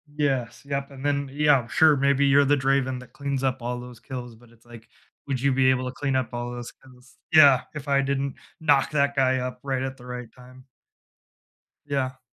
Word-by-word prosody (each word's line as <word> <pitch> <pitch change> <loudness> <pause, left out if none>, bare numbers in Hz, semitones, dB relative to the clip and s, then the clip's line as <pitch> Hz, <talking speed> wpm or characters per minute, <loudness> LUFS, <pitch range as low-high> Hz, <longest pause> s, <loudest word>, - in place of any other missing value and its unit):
Yes, 135 -6 -1
yep, 140 0 -4
and 135 0 -9
then, 140 -1 0
yeah, 145 -4 +3
sure, 155 +2 +4
maybe 140 +1 +2
you're 140 +1 +5
the 145 - +4
Draven 135 -1 0
that 125 - -14
cleans 140 -2 -3
up 130 -1 -1
all 120 +1 -3
those 125 -1 -11
kills, 125 -3 -8
but 120 +1 -20
it's, 115 0 -24
like, 115 -1 -14 0.4
"Would 135 -3 -2
you 140 0 +2
be 130 0 +3
able 130 0 +1
to 125 - -3
clean 140 -1 -2
up 125 -3 -1
all 120 0 -4
those 120 -1 -7
kills?" 125 -1 -21
Yeah, 140 -5 +7
if 150 -1 -7
I 140 -1 +3
didn't 140 0 -2 0.2
knock 145 -3 +2
that 140 -1 +1
guy 130 -1 +2
up, 125 0 -4
right 135 -2 -2
at 135 0 -5
the 125 - -14
right 125 -1 -7
time? 130 0 -16 1.2
Yeah. 130 -2 -2
130 Hz, 210 wpm, -25 LUFS, 125-140 Hz, 1.2 s, Yeah